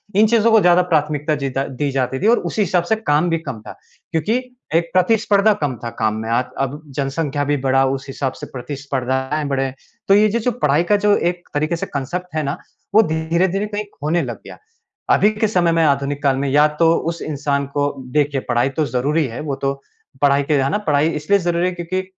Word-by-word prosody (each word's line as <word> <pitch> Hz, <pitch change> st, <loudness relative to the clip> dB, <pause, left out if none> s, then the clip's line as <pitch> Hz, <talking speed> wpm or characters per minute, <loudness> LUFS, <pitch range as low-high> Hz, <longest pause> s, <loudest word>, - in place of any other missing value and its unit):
इन 215 Hz, +2 st, +5 dB
चीज़ों 230 Hz, 0 st, +3 dB
को 220 Hz, -, +7 dB
ज़्यादा 180 Hz, 0 st, +5 dB
प्राथमिकता 150 Hz, 0 st, +1 dB
जीदा 135 Hz, 0 st, -1 dB
दी 140 Hz, +2 st, -2 dB
जाती 130 Hz, 0 st, -1 dB
थी 205 Hz, -, +2 dB
और 235 Hz, +2 st, +5 dB
उसी 220 Hz, -, -1 dB
हिसाब 180 Hz, -3 st, +1 dB
से -, -, +5 dB
काम 175 Hz, -6 st, +1 dB
भी 165 Hz, -, +1 dB
कम 120 Hz, -6 st, -5 dB
था। -, -, -9 dB, 0.3 s
क्योंकि 165 Hz, +9 st, +1 dB, 0.4 s
एक 170 Hz, 0 st, +2 dB
प्रतिस्पर्धा 210 Hz, +2 st, +3 dB
कम 135 Hz, -3 st, -1 dB
था 120 Hz, -, -3 dB
काम 110 Hz, -1 st, +1 dB
में। 110 Hz, -, -5 dB
आज 120 Hz, +2 st, +1 dB
अब 135 Hz, +3 st, -2 dB
जनसंख्या 145 Hz, +1 st, -1 dB
भी 145 Hz, +1 st, +1 dB
बढ़ा, 135 Hz, 0 st, +2 dB
उस 135 Hz, +1 st, -2 dB
हिसाब 135 Hz, 0 st, -3 dB
से -, -, -4 dB
प्रतिस्पर्धाएँ 135 Hz, +1 st, -3 dB
बढ़े। 135 Hz, -1 st, -1 dB, 0.3 s
तो 195 Hz, -, +5 dB
ये 210 Hz, +2 st, +5 dB
जे 230 Hz, +3 st, 0 dB
जो 245 Hz, +2 st, 0 dB
पढ़ाई 155 Hz, -, +1 dB
का -, -, +7 dB
जो 205 Hz, -, +5 dB
एक 175 Hz, 0 st, -2 dB
तरीके 155 Hz, +3 st, 0 dB
से 165 Hz, -, -4 dB
कांसेप्ट 160 Hz, +6 st, -4 dB
है 155 Hz, -, 0 dB
ना, 140 Hz, 0 st, -2 dB, 0.4 s
वो 220 Hz, -, +8 dB
धीरे-धीरे 170 Hz, +4 st, 0 dB
कहीं 210 Hz, 0 st, -3 dB, 0.2 s
खोने 155 Hz, +4 st, 0 dB
लग -, -, -6 dB
गया। -, -, -10 dB, 0.5 s
अभी 210 Hz, -, +5 dB
के 215 Hz, +1 st, 0 dB
समय 180 Hz, -5 st, +2 dB
में 165 Hz, 0 st, +2 dB
आधुनिक 140 Hz, -1 st, 0 dB
काल 135 Hz, -2 st, +2 dB
में 140 Hz, +1 st, -1 dB
या 145 Hz, +2 st, +5 dB
तो 165 Hz, -1 st, +5 dB, 0.2 s
उस 170 Hz, 0 st, -5 dB
इंसान 140 Hz, -2 st, -1 dB
को 145 Hz, -, 0 dB, 0.3 s
देखिए 145 Hz, -2 st, +1 dB
पढ़ाई 120 Hz, +2 st, +2 dB
तो 155 Hz, -, +2 dB
ज़रूरी 140 Hz, +5 st, 0 dB
है 115 Hz, 0 st, -7 dB
वो 145 Hz, -3 st, -3 dB
तो, 135 Hz, 0 st, -1 dB, 0.5 s
पढ़ाई 140 Hz, 0 st, +4 dB
के 150 Hz, -, -1 dB
है 135 Hz, -, +1 dB
ना? 155 Hz, -, +1 dB
पढ़ाई 155 Hz, -6 st, +1 dB
इसलिए 165 Hz, +6 st, +1 dB
ज़रूरी 175 Hz, 0 st, 0 dB
है -, -, -1 dB
क्योंकि 175 Hz, +2 st, -3 dB
150 Hz, 220 wpm, -19 LUFS, 135-180 Hz, 0.5 s, वो